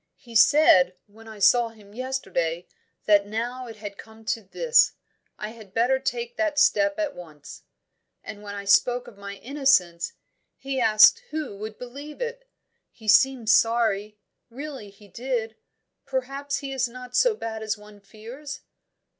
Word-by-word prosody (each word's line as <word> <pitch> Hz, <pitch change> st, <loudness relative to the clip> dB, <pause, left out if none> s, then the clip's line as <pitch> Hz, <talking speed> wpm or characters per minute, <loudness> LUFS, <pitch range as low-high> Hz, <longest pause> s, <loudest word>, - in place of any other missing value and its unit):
"He 235 Hz, -3 st, -15 dB
said, 185 Hz, -, +6 dB
when 225 Hz, +2 st, -17 dB
I 220 Hz, -1 st, -10 dB
saw 230 Hz, +4 st, +4 dB
him 210 Hz, -3 st, -18 dB
yesterday, 195 Hz, -10 st, -3 dB, 0.4 s
that 205 Hz, -1 st, +4 dB
now 240 Hz, +4 st, -4 dB
it 225 Hz, -, -9 dB
had 205 Hz, -2 st, -9 dB
come 220 Hz, 0 st, -14 dB
to 225 Hz, -, -8 dB
this, 485 Hz, -, +3 dB, 0.4 s
I 210 Hz, -, -5 dB
had 220 Hz, -3 st, -14 dB
better 250 Hz, +4 st, +2 dB
take 475 Hz, -, -4 dB
that 315 Hz, -3 st, 0 dB
step 300 Hz, 0 st, +3 dB
at 310 Hz, -2 st, -2 dB
once. 155 Hz, -4 st, -12 dB, 0.6 s
And 210 Hz, -1 st, -9 dB
when 205 Hz, -1 st, -7 dB
I 200 Hz, 0 st, -6 dB
spoke 245 Hz, +5 st, +3 dB
of -, -, -13 dB
my 200 Hz, 0 st, -7 dB
innocence, 225 Hz, -, +1 dB, 0.4 s
he 270 Hz, -1 st, -3 dB
asked 220 Hz, -, +6 dB
who 305 Hz, -9 st, -4 dB
would 215 Hz, +1 st, -7 dB
believe 280 Hz, +5 st, -9 dB
it? -, -, -5 dB, 0.4 s
He 220 Hz, -, -15 dB
seemed 230 Hz, +1 st, +4 dB
sorry; 220 Hz, -3 st, +2 dB, 0.3 s
really 265 Hz, -3 st, -8 dB
he 205 Hz, +1 st, -18 dB
did. 230 Hz, +1 st, -3 dB, 0.5 s
Perhaps 275 Hz, +1 st, -3 dB
he 275 Hz, -1 st, -5 dB
is 255 Hz, -2 st, 0 dB
not 250 Hz, +1 st, -10 dB
so -, -, +4 dB
bad 220 Hz, -, -5 dB
as 220 Hz, 0 st, -2 dB
one 210 Hz, 0 st, -15 dB
fears?" 235 Hz, +9 st, -10 dB
230 Hz, 155 wpm, -25 LUFS, 210-270 Hz, 0.6 s, said